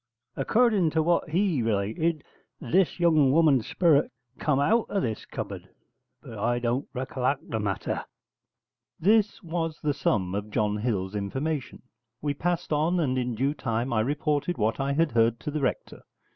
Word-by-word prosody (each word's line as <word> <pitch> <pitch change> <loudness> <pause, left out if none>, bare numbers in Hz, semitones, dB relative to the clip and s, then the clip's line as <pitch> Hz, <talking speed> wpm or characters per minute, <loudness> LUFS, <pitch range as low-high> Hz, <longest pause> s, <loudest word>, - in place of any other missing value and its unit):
According 210 - +3
to 160 - +4
what 170 0 +1
he 175 -4 +1
related, 115 +9 0 0.4
this 180 +9 +1
young 155 -6 +4
woman's 145 -6 +4
sperit 160 -5 +3 0.3
come 150 -3 +1
out 215 +11 +2
of 200 - 0
this 110 -3 -3
cupboard: - - -6 0.5
but 110 - -9
I 120 +3 +1
don't 120 +3 -2
racollact 130 +1 -2
the 110 - -1
matter.' 100 -2 -2 0.9
This 210 +3 +2
was 165 -2 -3
the 150 -1 +1
sum 95 -9 0
of 105 +1 -3
John 105 0 0
Hill's 105 -4 -2
information. 130 +8 -3 0.4
We 145 -1 -1
passed 170 +2 -2
on, 160 +4 +1
and 135 -6 +1
in 125 -2 -1
due 135 +5 0
time 120 -3 -2
I 110 - +2
reported 150 +6 -1
what 110 +4 0
I 135 +1 0
had 160 +1 +2
heard 115 0 +2
to 150 - -4
the 150 0 -2
Rector. 130 - -2
140 Hz, 160 wpm, -27 LUFS, 115-165 Hz, 0.9 s, to